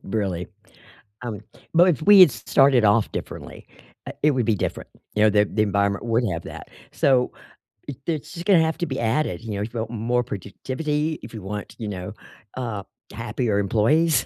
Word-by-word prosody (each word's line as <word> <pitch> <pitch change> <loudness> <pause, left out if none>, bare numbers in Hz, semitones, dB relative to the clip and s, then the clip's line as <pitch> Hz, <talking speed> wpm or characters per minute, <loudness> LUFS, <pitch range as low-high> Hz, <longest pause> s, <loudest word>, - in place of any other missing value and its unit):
Really? 95 -5 -2 0.7
Um, 110 -4 -5 0.3
but 175 +2 +6
if 155 -5 +1
we 205 +4 +8
had 180 - +10
s - - -8
started 135 -4 +4
off 105 +1 +3
differently, - - -7 0.4
uh, - - -5
it 150 - +4
would 130 -3 0
be 115 - +3
different, 100 - -4 0.2
you 105 - +2
know, 110 - +6
the 105 0 +4
the 105 +1 0
environment 100 0 0
would 115 +1 +1
have 85 0 -4
that, - - -9 0.2
so 130 -2 +2 0.6
it 140 - -5
it's 155 -4 -3
just 170 +1 -7
gonna 195 -4 +5
have 160 0 0
to 175 - 0
be 135 -3 -4
added, 115 - 0
you 110 -2 -5
know, 100 - -3
if 110 +3 -5
you 115 - -3
want 110 0 -3
more 120 +2 0
productivity, 150 - -3
if 110 - -10
you 110 - -7
want, 105 +2 -6
you 110 - -4
know, 90 -3 -5 0.4
uh, 115 -6 -4 0.3
happier 110 -5 -2
employees, 120 - +2
115 Hz, 200 wpm, -23 LUFS, 105-145 Hz, 0.7 s, had